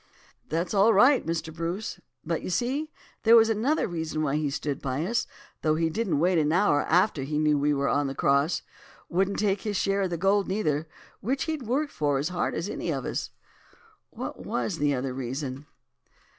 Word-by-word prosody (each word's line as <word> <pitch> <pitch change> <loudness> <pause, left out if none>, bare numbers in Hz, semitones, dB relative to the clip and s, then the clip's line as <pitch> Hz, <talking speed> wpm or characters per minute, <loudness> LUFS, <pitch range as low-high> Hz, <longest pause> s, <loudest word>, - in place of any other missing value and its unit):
"'That's 165 +6 -1
all 205 +3 +5
right, 250 +5 +5
Mr. 165 -1 -2
Bruce; 170 +6 -4 0.3
but 165 0 -1
you - - -5
see 260 - -1 0.3
there 230 +1 +6
was 225 -1 +6
another 235 +8 +1
reason 160 -3 -3
why 145 -1 0
he 150 -1 0
stood 140 0 -3
by 135 +3 -2
us, 235 +5 0 0.3
though 155 -1 +2
he 165 0 0
didn't 195 -5 0
wait 175 +3 +3
an 150 0 +2
hour 170 -4 +3
after 175 -3 +3
he 150 +3 -2
knew 150 -1 +3
we 145 +1 +2
were 140 -1 +1
on 145 0 +1
the 135 - -4
cross; 140 +5 +2 0.5
wouldn't 195 +3 +1
take 200 -2 +1
his 210 -3 -2
share 195 +1 +1
of 190 - 0
the 170 - -2
gold 195 +3 +2
neither, 160 -6 -1 0.3
which 265 +6 -1
he'd 310 -7 -4
worked 285 +5 0
as 145 +1 +1
hard 180 -1 -1
for - - -2
as 170 - -2
any 175 - -4
of 135 -5 -2
us.' - - -3 0.8
"'What - - -7
was 120 -2 -2
the 145 -1 +2
other 130 0 -3
reason? 130 +2 -5
165 Hz, 200 wpm, -27 LUFS, 145-205 Hz, 0.8 s, there